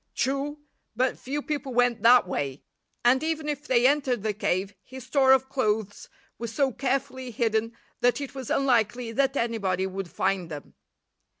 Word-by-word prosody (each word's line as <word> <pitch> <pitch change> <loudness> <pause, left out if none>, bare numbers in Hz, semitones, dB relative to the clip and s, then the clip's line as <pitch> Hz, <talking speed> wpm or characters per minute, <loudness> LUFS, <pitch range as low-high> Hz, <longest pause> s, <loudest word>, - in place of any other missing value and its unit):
True, 275 +2 -1 0.4
but 255 +2 0
few 285 +3 -4
people 285 -4 -4
went 245 -3 +2
that 240 -2 +6
way, 140 -5 -3 0.4
and 255 +2 +5
even 315 -1 -2
if 295 0 -4
they 245 -1 +3
entered 260 -5 +2
the 215 -1 0
cave 195 -1 -1
his 260 -1 -10
store 265 0 +4
of 265 0 +4
clothes 215 -6 -2 0.3
was 235 -1 -4
so 275 +2 +1
carefully 260 0 -2
hidden 225 0 -1 0.2
that 245 +2 +2
it 280 -2 -6
was 265 -3 -7
unlikely 240 -2 +1
that 270 +3 +1
anybody 200 -6 0
would 190 -1 -5
find 190 -2 -1
them. 150 -3 -8
245 Hz, 165 wpm, -26 LUFS, 215-270 Hz, 0.4 s, that